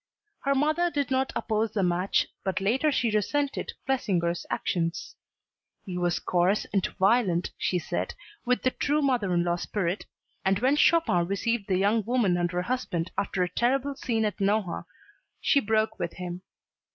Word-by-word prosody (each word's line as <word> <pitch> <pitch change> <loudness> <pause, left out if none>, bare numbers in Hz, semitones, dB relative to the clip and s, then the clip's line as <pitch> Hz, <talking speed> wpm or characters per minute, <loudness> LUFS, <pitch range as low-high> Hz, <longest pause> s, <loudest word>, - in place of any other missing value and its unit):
Her 275 0 +1
mother 310 +5 +2
did 285 -5 -2
not 265 0 +1
oppose 220 0 -1
the 200 - +1
match, 180 +2 +2 0.2
but 190 -1 -1
later 250 +10 +2
she 245 -4 +1
resented 280 +7 -1
Clesinger's 180 -10 0
actions. 165 -1 -2 0.7
He 185 - -5
was 175 -1 +1
coarse 180 +3 +1
and 195 -2 +2
violent, 195 -3 +2
she 180 - 0
said, 175 - -3 0.3
with 250 0 +1
the 255 - +3
true 295 +3 0
mother 245 -9 +1
in 175 -1 +2
law 175 0 0
spirit 180 +1 -2 0.4
and 190 0 +2
when 260 +7 +3
Chopin 295 - +3
received 205 +2 -1
the 185 -2 +2
young 205 +3 +2
woman 225 -5 +2
and 175 0 0
her 180 0 -1
husband 185 -8 -2
after 195 -2 0
a - - 0
terrible 270 +6 +1
scene 230 -5 -1
at 210 - -2
Nohant, 195 -4 0 0.5
she 285 - +3
broke 220 -2 0
with 170 - -3
him. 180 0 -6
210 Hz, 165 wpm, -27 LUFS, 180-255 Hz, 0.7 s, the